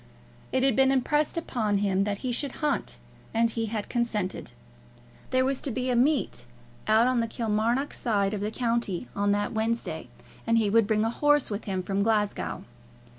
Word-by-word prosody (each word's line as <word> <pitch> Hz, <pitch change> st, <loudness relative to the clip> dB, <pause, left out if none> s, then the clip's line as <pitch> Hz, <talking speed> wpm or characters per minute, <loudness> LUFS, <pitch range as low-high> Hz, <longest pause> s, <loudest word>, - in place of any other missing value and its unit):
It 260 Hz, 0 st, +1 dB
had 270 Hz, -4 st, +4 dB
been 265 Hz, 0 st, +5 dB
impressed 295 Hz, +4 st, +1 dB
upon 220 Hz, -10 st, 0 dB
him 195 Hz, -1 st, +1 dB
that 205 Hz, -1 st, -1 dB
he 250 Hz, -, 0 dB
should 265 Hz, +2 st, -2 dB
hunt, 280 Hz, -, -1 dB, 0.4 s
and 230 Hz, 0 st, +3 dB
he 225 Hz, 0 st, -2 dB
had 215 Hz, -1 st, -3 dB
consented. 225 Hz, -6 st, -2 dB, 0.8 s
There 255 Hz, 0 st, +2 dB
was 270 Hz, 0 st, -1 dB
to -, -, -2 dB
be 255 Hz, +1 st, -1 dB
a -, -, +1 dB
meet 250 Hz, -, +1 dB, 0.4 s
out 220 Hz, +2 st, +5 dB
on 255 Hz, -1 st, +2 dB
the 230 Hz, -, 0 dB
Kilmarnock 230 Hz, +4 st, 0 dB
side 200 Hz, -3 st, +1 dB
of 205 Hz, -, -3 dB
the 210 Hz, -, -1 dB
county 235 Hz, -3 st, -1 dB
on 205 Hz, 0 st, +1 dB
that 205 Hz, +2 st, -1 dB
Wednesday, 230 Hz, +1 st, -2 dB, 0.4 s
and 230 Hz, 0 st, +4 dB
he 215 Hz, -3 st, +2 dB
would 225 Hz, -1 st, +4 dB
bring 215 Hz, 0 st, +2 dB
a 225 Hz, -, 0 dB
horse 295 Hz, -1 st, +2 dB
with 205 Hz, +1 st, -4 dB
him 190 Hz, -3 st, -2 dB
from 195 Hz, +1 st, -1 dB
Glasgow. 210 Hz, -1 st, 0 dB
230 Hz, 185 wpm, -27 LUFS, 205-255 Hz, 0.8 s, been